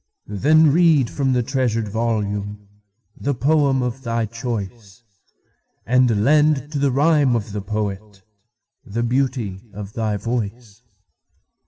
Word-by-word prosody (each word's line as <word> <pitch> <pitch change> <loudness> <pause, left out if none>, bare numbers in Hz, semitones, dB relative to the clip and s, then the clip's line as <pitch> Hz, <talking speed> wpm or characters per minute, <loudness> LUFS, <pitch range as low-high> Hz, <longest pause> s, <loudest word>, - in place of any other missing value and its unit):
Then 150 +9 +4
read 160 -7 +4
from 135 -2 0
the 125 -1 +1
treasured 120 -4 -1
volumeThe 105 +1 -4
poem 140 -2 +2
of 125 +2 -4
thy 115 -2 -1
choice, 115 -3 -6 0.8
And 120 -4 +3
lend 150 0 +3
to 145 - -2
the 140 0 +2
rhyme 145 -2 +3
of 110 -2 -3
the 105 0 -4
poetThe 105 +2 -6
beauty 125 -7 -1
of 105 0 -8
thy 110 -2 -1
voice. 115 0 -4
115 Hz, 115 wpm, -21 LUFS, 105-135 Hz, 0.8 s, Then